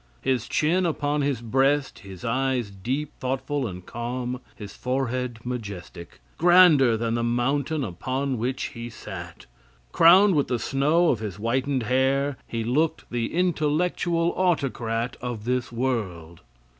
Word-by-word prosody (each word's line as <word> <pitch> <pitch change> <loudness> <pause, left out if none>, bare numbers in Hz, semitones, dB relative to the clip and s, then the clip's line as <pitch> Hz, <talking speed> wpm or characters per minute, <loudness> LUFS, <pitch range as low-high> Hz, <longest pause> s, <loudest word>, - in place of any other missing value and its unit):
His 130 -3 0
chin 175 +4 +2
upon 145 -2 -1
his 140 -4 -1
breast, 135 +4 +1
his 95 -2 -10
eyes 125 -2 0
deep, 130 +10 -3
thoughtful 135 +1 -2
and 90 -2 -8
calm, 125 +1 -4
his 100 -2 -9
forehead 125 -1 -2
majestic 100 -8 -7 0.2
grander 165 -9 +6
than 115 0 -1
the 120 - 0
mountain 135 +5 0
upon 130 +6 -2
which 130 +3 -2
he 115 -1 -6
sat. 90 -6 -9 0.5
"Crowned 185 - +7
with 145 -3 +2
the 125 - 0
snow 150 +8 +2
of 120 - +1
his 105 -4 -5
whitened 130 +4 -1
hair," 135 +3 +1
he 115 -1 -3
looked 150 +8 0
the 120 -1 -2
intellectual 170 0 +1
autocrat 125 -10 -1
of 120 -4 -5
this 125 0 -1
world. 100 -10 -3
130 Hz, 135 wpm, -25 LUFS, 115-145 Hz, 0.5 s, Crowned